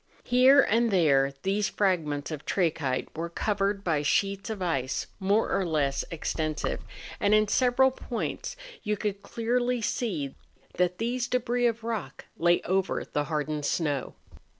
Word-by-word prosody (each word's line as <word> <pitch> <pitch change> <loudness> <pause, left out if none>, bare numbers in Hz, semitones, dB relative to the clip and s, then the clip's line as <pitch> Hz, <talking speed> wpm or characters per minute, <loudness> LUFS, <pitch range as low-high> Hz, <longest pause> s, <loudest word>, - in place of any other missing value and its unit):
Here 260 +3 +6
and 235 -1 +2
there 140 -8 +3
these 195 +1 +1
fragments 160 -7 0
of 150 -2 -5
trachyte 155 -8 -1
were 165 +2 -3
covered 200 +2 -1
by 160 -5 +1
sheets 195 +8 0
of 220 -2 -4
ice 135 -8 -1
more 200 +3 +2
or 195 - +1
less 145 -5 0
extensive, 155 -1 -2 0.4
and 205 +1 +4
in 215 0 +4
several 255 +3 +3
points 255 - -4 0.3
you 210 -2 -1
could 200 -1 -3
clearly 245 +2 0
see 185 - -2 0.4
that 180 0 +1
these 240 +2 -1
debris 245 0 +1
of 230 -1 -2
rock 225 -4 -4
lay 175 +1 +3
over 190 +1 0
the 145 0 -2
hardened 150 0 -2
snow. 145 -5 -1
195 Hz, 145 wpm, -28 LUFS, 155-230 Hz, 0.4 s, Here